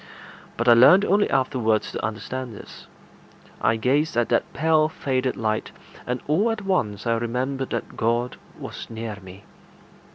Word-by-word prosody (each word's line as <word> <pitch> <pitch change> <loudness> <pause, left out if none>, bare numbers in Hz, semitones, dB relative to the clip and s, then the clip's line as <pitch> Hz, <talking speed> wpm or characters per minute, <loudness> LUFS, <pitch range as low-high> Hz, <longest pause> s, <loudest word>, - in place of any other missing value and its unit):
But - - -1
I 120 - +9
learned 180 - +7
only 205 +2 +2
afterwards 125 -5 +1
to - - -5
understand 115 +2 -4
this. - - -12 0.7
I 110 - +3
gazed 140 +6 +1
at 120 - +1
that - - +1
pale 155 0 +2
faded 130 -4 -2
light, 110 -1 -2 0.4
and 125 0 -2
all 185 +10 +2
at 220 -3 -3
once 110 - -1
I 115 - +2
remembered 130 +3 -2
that 115 - -5
God 120 +2 0 0.2
was - - -8
near 115 -2 -6
me. 95 +1 -13
125 Hz, 155 wpm, -24 LUFS, 115-150 Hz, 0.7 s, I